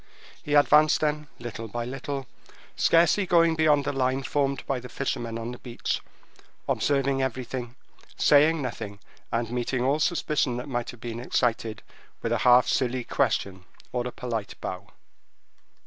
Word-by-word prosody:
He 150 Hz, -, -1 dB
advanced 150 Hz, +1 st, +5 dB
then 150 Hz, 0 st, -1 dB
little 115 Hz, -1 st, -6 dB
by 120 Hz, +2 st, -4 dB
little, 135 Hz, +2 st, -4 dB, 0.5 s
scarcely 170 Hz, +4 st, +4 dB
going 170 Hz, -1 st, +4 dB
beyond 150 Hz, -3 st, +3 dB
the -, -, 0 dB
line 130 Hz, 0 st, 0 dB
formed 140 Hz, -1 st, -1 dB
by 135 Hz, -2 st, -1 dB
the 125 Hz, -, -10 dB
fishermen 120 Hz, -4 st, -3 dB
on 115 Hz, +1 st, -5 dB
the 125 Hz, -, -9 dB
beach, 120 Hz, -2 st, -3 dB, 0.7 s
observing 140 Hz, -1 st, +1 dB
everything, 130 Hz, -1 st, -4 dB, 0.4 s
saying 150 Hz, +1 st, +5 dB
nothing, 110 Hz, -5 st, -5 dB, 0.3 s
and 115 Hz, 0 st, -1 dB
meeting 125 Hz, +1 st, -1 dB
all 140 Hz, +4 st, +2 dB
suspicion 150 Hz, -6 st, +1 dB
that 125 Hz, -, -5 dB
might 120 Hz, -3 st, -3 dB
have 120 Hz, -, -10 dB
been 115 Hz, -1 st, -5 dB
excited 115 Hz, -3 st, -1 dB, 0.4 s
with -, -, -1 dB
a -, -, +1 dB
half 125 Hz, -1 st, +6 dB
silly 130 Hz, -1 st, 0 dB
question 95 Hz, -4 st, -1 dB, 0.3 s
or 125 Hz, -1 st, -1 dB
a -, -, -5 dB
polite 115 Hz, -5 st, -4 dB
bow. 95 Hz, +2 st, -6 dB
130 Hz, 150 wpm, -26 LUFS, 120-145 Hz, 0.7 s, half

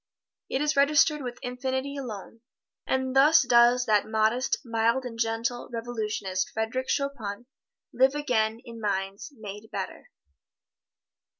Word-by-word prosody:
It 270 Hz, -, 0 dB
is 300 Hz, 0 st, +1 dB
registered 300 Hz, +2 st, +4 dB
with 245 Hz, -2 st, -5 dB
Infinity 260 Hz, +2 st, -3 dB
alone. 230 Hz, -4 st, -7 dB, 0.5 s
And 260 Hz, 0 st, -1 dB
thus 295 Hz, +3 st, +6 dB
does 240 Hz, 0 st, +5 dB
that 210 Hz, -3 st, +2 dB
modest, 220 Hz, +4 st, +1 dB
mild 230 Hz, +2 st, +1 dB
and 230 Hz, -2 st, -7 dB
gentle 230 Hz, +2 st, -1 dB
revolutionist 215 Hz, -5 st, -3 dB
Frederic 225 Hz, +4 st, -3 dB
Chopin 240 Hz, -6 st, -2 dB, 0.5 s
live 265 Hz, +3 st, +3 dB
again 230 Hz, -6 st, 0 dB
in 230 Hz, -2 st, -9 dB
minds 195 Hz, +6 st, -3 dB
made 210 Hz, 0 st, -9 dB
better. -, -, -6 dB
240 Hz, 120 wpm, -27 LUFS, 220-265 Hz, 0.5 s, thus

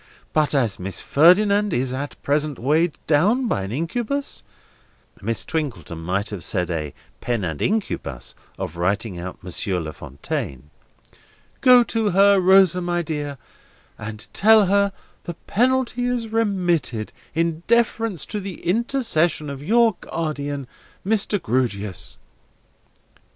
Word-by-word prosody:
But 155 Hz, -1 st, +2 dB
as 120 Hz, -8 st, +1 dB
Miss 95 Hz, +1 st, -3 dB
Ferdinand 200 Hz, +5 st, +4 dB
is 130 Hz, +1 st, 0 dB
at 140 Hz, +2 st, -5 dB
present 145 Hz, -1 st, 0 dB
weighed 150 Hz, +5 st, +1 dB
down 205 Hz, -, +3 dB
by 100 Hz, -, 0 dB
an 95 Hz, +1 st, -5 dB
incubus"—Miss 170 Hz, -, -5 dB
Twinkleton 135 Hz, -, -4 dB
might 95 Hz, +6 st, -2 dB
have 100 Hz, -5 st, -5 dB
said 90 Hz, -1 st, -1 dB
a 75 Hz, -4 st, -4 dB, 0.2 s
pen 120 Hz, -4 st, -2 dB
and 80 Hz, -4 st, -3 dB
ink 215 Hz, +1 st, +2 dB
ubus 65 Hz, -4 st, -6 dB, 0.2 s
of 85 Hz, -, -5 dB
writing 100 Hz, +2 st, -1 dB
out 90 Hz, +1 st, -8 dB
Monsieur 90 Hz, +1 st, -2 dB
La 80 Hz, -2 st, -5 dB
Fontaine—"go 75 Hz, -, -1 dB
to 225 Hz, -2 st, 0 dB
her, 200 Hz, +1 st, +5 dB
Rosa 185 Hz, -1 st, +5 dB
my 175 Hz, 0 st, -1 dB
dear, 145 Hz, -3 st, -4 dB, 0.6 s
and 110 Hz, 0 st, -7 dB
tell 215 Hz, 0 st, +6 dB
her 200 Hz, +1 st, +3 dB, 0.3 s
the 175 Hz, -, -5 dB
penalty 250 Hz, +2 st, +1 dB
is 245 Hz, -2 st, -1 dB
remitted, 175 Hz, -, 0 dB, 0.2 s
in 165 Hz, 0 st, 0 dB
deference 230 Hz, -5 st, +1 dB
to 210 Hz, -, -4 dB
the 195 Hz, -2 st, -7 dB
intercession 175 Hz, -, +1 dB
of 140 Hz, -1 st, -7 dB
your 225 Hz, +5 st, +3 dB
guardian, 145 Hz, -3 st, -3 dB, 0.4 s
Mr. 205 Hz, 0 st, +1 dB
Grewgious." 105 Hz, -, -2 dB
155 Hz, 125 wpm, -22 LUFS, -, 0.6 s, tell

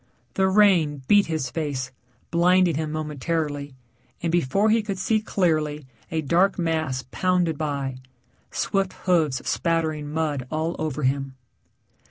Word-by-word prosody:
The 190 Hz, 0 st, +2 dB
rain 180 Hz, -8 st, +3 dB
beat 205 Hz, +3 st, +5 dB
his 155 Hz, -6 st, -2 dB
face, 135 Hz, -3 st, -3 dB, 0.4 s
blinding 180 Hz, +1 st, +4 dB
him 155 Hz, +1 st, -2 dB
momentarily, 150 Hz, -2 st, -3 dB, 0.5 s
and 165 Hz, -, 0 dB
before 175 Hz, +6 st, +2 dB
he 225 Hz, 0 st, +4 dB
could 200 Hz, -2 st, -4 dB
see 215 Hz, +3 st, +1 dB
clearly 155 Hz, -8 st, 0 dB, 0.2 s
a 160 Hz, -1 st, -1 dB
dark 175 Hz, +7 st, +2 dB
mass 160 Hz, -7 st, -1 dB
pounded 180 Hz, -3 st, +1 dB
by, 140 Hz, -3 st, -3 dB, 0.5 s
swift 195 Hz, -1 st, -1 dB
hoofs 160 Hz, -8 st, +1 dB
spattering 160 Hz, -3 st, 0 dB
mud 150 Hz, -5 st, -2 dB
all 160 Hz, +2 st, -2 dB
over 155 Hz, -2 st, -2 dB
him. 135 Hz, 0 st, 0 dB
160 Hz, 130 wpm, -24 LUFS, 145-180 Hz, 0.5 s, beat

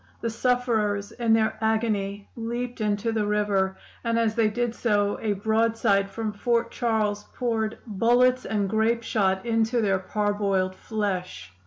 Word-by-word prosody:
The 230 Hz, -, -1 dB
sufferers, 225 Hz, -4 st, 0 dB
in 235 Hz, -2 st, -1 dB
their 220 Hz, -1 st, +2 dB
agony, 210 Hz, -3 st, 0 dB
leaped 240 Hz, +1 st, -4 dB
into 210 Hz, +1 st, 0 dB
the 215 Hz, -2 st, 0 dB
river, 200 Hz, -2 st, +1 dB, 0.3 s
and 230 Hz, -1 st, 0 dB
as 225 Hz, -2 st, +2 dB
they 220 Hz, -1 st, +2 dB
did 240 Hz, +2 st, -1 dB
so 205 Hz, -4 st, +1 dB
a 215 Hz, -2 st, 0 dB
broadside 220 Hz, -1 st, +1 dB
from 215 Hz, +1 st, -4 dB
Fort 235 Hz, +2 st, 0 dB
Charles 215 Hz, -3 st, 0 dB
poured 225 Hz, -3 st, -1 dB
bullets 245 Hz, +4 st, +3 dB
and 205 Hz, -2 st, -1 dB
grapeshot 220 Hz, -2 st, +1 dB
into 225 Hz, +1 st, +1 dB
their 195 Hz, -3 st, +2 dB
parboiled 200 Hz, -1 st, 0 dB
flesh. 185 Hz, -, -4 dB
220 Hz, 140 wpm, -25 LUFS, 205-230 Hz, 0.3 s, bullets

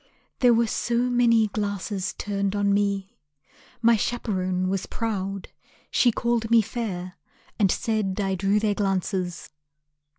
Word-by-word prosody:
There 245 Hz, -2 st, +5 dB
were 230 Hz, +1 st, +3 dB
so 235 Hz, +1 st, -1 dB
many 240 Hz, -2 st, +3 dB
glasses 200 Hz, -2 st, -3 dB
turned 200 Hz, -1 st, -2 dB
on 200 Hz, 0 st, +2 dB
me, 200 Hz, 0 st, 0 dB, 0.7 s
My 230 Hz, 0 st, +6 dB
chaperon 185 Hz, -5 st, -1 dB
was 190 Hz, 0 st, -2 dB
proud. 195 Hz, -4 st, -3 dB, 0.4 s
She 245 Hz, -, +4 dB
called 235 Hz, -1 st, -1 dB
me 230 Hz, -1 st, +5 dB
fair, 190 Hz, -6 st, -5 dB, 0.4 s
And 200 Hz, -3 st, +4 dB
said 215 Hz, -4 st, -1 dB
I 195 Hz, -1 st, 0 dB
drew 195 Hz, +3 st, +1 dB
their 210 Hz, -1 st, +1 dB
glances. 190 Hz, -3 st, -2 dB
205 Hz, 130 wpm, -25 LUFS, 195-230 Hz, 0.7 s, My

